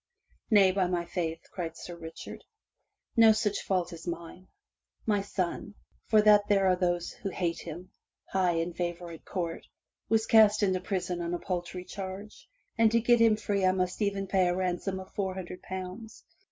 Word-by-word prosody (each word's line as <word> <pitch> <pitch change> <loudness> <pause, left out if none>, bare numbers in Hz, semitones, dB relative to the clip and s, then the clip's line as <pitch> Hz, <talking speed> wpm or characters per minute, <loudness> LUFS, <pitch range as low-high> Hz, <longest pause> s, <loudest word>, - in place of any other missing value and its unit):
"Nay, 200 -4 +6
by 185 -1 +1
my 175 -1 -1
faith," 165 -2 -3
cried 165 -3 -5
Sir 175 - -8
Richard, 165 -1 -9 0.7
"No 225 -2 +8
such 210 -2 0
fault 180 -2 -1
is 165 +1 -10
mine. 170 +2 -6 0.6
My 205 -2 +2
son, 195 +1 -3 0.3
for 215 -1 +5
that 210 -1 +6
there 195 -1 +3
are 185 -1 +4
those 175 -1 -1
who 195 - -5
hate 170 -2 -2
him 170 +2 -8 0.3
high 185 -2 +1
in 165 +1 -1
favor 175 0 -4
at 165 - -11
court, 170 -4 -4 0.4
was 225 0 +3
cast 215 -1 +5
into 185 -2 +2
prison 180 -2 -2
on 170 +1 -2
a - - -4
paltry 180 0 -4
charge, 195 +2 -8 0.3
and 225 -1 +5
to 230 - +4
get 240 +1 +4
him 225 -2 +6
free 205 -2 -1
I 185 0 +4
must 185 +2 -2
e'en 200 -1 0
pay 190 -1 +2
a 175 - +1
ransom 185 +1 -2
of 190 - -11
four 190 -3 -2
hundred 180 -1 -7
pounds. 190 +4 -7
185 Hz, 180 wpm, -29 LUFS, 175-205 Hz, 0.7 s, No